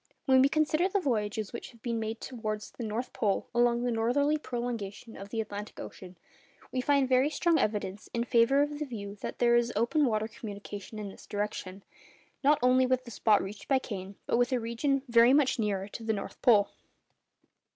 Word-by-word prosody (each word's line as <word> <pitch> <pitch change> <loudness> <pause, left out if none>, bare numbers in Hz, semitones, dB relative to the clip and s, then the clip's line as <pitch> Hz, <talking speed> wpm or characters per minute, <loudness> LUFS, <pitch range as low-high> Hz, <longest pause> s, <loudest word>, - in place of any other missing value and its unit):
When 260 -1 +6
we 270 - +5
consider 310 +4 +2
the 400 - +1
voyages 215 - -1
which 235 - -6
have 235 - -19
been 235 -2 -1
made 220 +1 -3
towards 215 -4 -5
the 240 - -7
North 225 +3 -3
Pole 200 -3 0
along 240 0 +3
the 245 - 0
northerly 250 +7 +2
prolongation 235 -4 -5
of 200 +1 -9
the 225 - -3
Atlantic 210 -1 -5
Ocean, 185 -1 -9 0.5
we 255 - -1
find 280 0 +3
very 260 +2 +3
strong 330 +1 +2
evidence 205 -4 -2
in 235 - -1
favour 245 +4 +4
of 295 0 -4
the 300 - -2
view 205 -6 -7
that - - -5
there 240 -1 +4
is 240 0 +2
open 250 +7 +2
water 215 -2 0
communication 205 -1 -8
in 210 -2 -5
this - - -14
direction, 205 -2 -4 0.6
not 290 +2 +5
only 255 +1 +4
with 255 0 0
the 235 - -9
spot 215 -1 +3
reached 200 +2 -8
by 270 - +4
Kane, 200 -6 -6
but - - +1
with 245 +1 +2
a 255 - +2
region 250 +4 -1
very 235 +1 +6
much 280 -3 +3
nearer 200 -3 -1
to 230 - -8
the 220 0 0
North 200 - -6
Pole. 215 -6 +5
235 Hz, 200 wpm, -29 LUFS, 210-260 Hz, 0.6 s, When